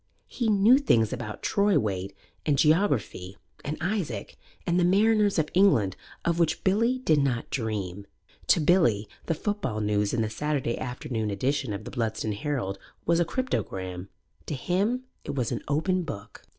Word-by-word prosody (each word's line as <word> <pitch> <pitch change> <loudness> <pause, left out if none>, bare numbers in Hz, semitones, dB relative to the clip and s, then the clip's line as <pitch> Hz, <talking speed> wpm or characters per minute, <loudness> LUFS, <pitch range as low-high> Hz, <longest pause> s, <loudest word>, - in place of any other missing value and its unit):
He 235 -3 -2
knew 215 +6 +6
things 115 - +2
about 120 -4 -6
troy 200 -1 +3
weight 100 -2 -2 0.3
and 145 -3 +1
geography 140 - +1 0.3
and 150 +2 -3
Isaac 175 - -3 0.3
and 175 +1 +2
the - - +3
Mariners 205 +2 +3
of 155 -2 +1
England 115 - +4 0.3
of 170 0 +1
which 165 -2 +1
Billy 230 +6 +2
did 160 - +2
not 130 -4 -1
dream. 100 -5 -3 0.4
To - - +5
Billy 150 - +3 0.2
the 165 - +1
football 155 - -2
news 105 -1 +1
in 115 -2 +1
the 110 - -2
Saturday 145 -3 -1
afternoon 120 -3 -3
edition 130 +5 -1
of 100 +1 -4
The - - -8
Bludston 110 -2 -2
Herald 115 -6 -3 0.3
was 170 0 +3
a 170 - +3
cryptogram; 95 - -3 0.4
to 150 - -2
him 200 - 0 0.2
it 145 - -5
was 125 -4 -1
an - - -2
open 170 +6 +1
book. 105 - -8
140 Hz, 165 wpm, -27 LUFS, -, 0.4 s, knew